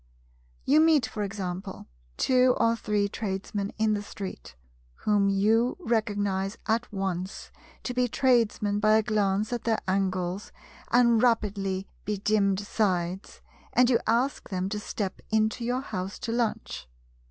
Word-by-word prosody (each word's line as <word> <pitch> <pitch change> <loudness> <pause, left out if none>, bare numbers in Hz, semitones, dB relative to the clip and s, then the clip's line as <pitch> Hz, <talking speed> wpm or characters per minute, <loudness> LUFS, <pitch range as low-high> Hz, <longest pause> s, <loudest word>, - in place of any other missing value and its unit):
You 295 +3 +5
meet, 315 -5 +5
for 215 - -5
example, 190 -1 -5 0.3
two 255 -1 +4
or 230 0 +3
three 210 -2 0
Tradesmen 200 -1 -3
in 215 -1 +2
the 205 - -1
street, 195 - -8 0.5
whom 205 -2 +3
your 220 +5 +2
recognize 205 - -1
at 230 +2 0
once 190 -2 -4 0.3
to 250 - -3
be 250 0 +2
Tradesman 225 -5 +2
by 215 0 +4
a 220 - +2
glance 210 +1 0
at 240 - -3
their 225 -2 +1
angles 185 0 -1 0.4
and 235 -2 +4
rapidly 200 -5 0 0.2
bedimmed 205 -1 +1
sides, 190 -3 -2 0.3
and 250 0 +4
you 235 - +4
ask 240 +5 0
them 185 0 -2
to 210 0 -3
step 205 -2 -4
into 220 +2 +1
your 250 +2 0
house 190 -6 -5
to 235 - -4
lunch. 225 - -2
210 Hz, 140 wpm, -27 LUFS, 195-230 Hz, 0.5 s, You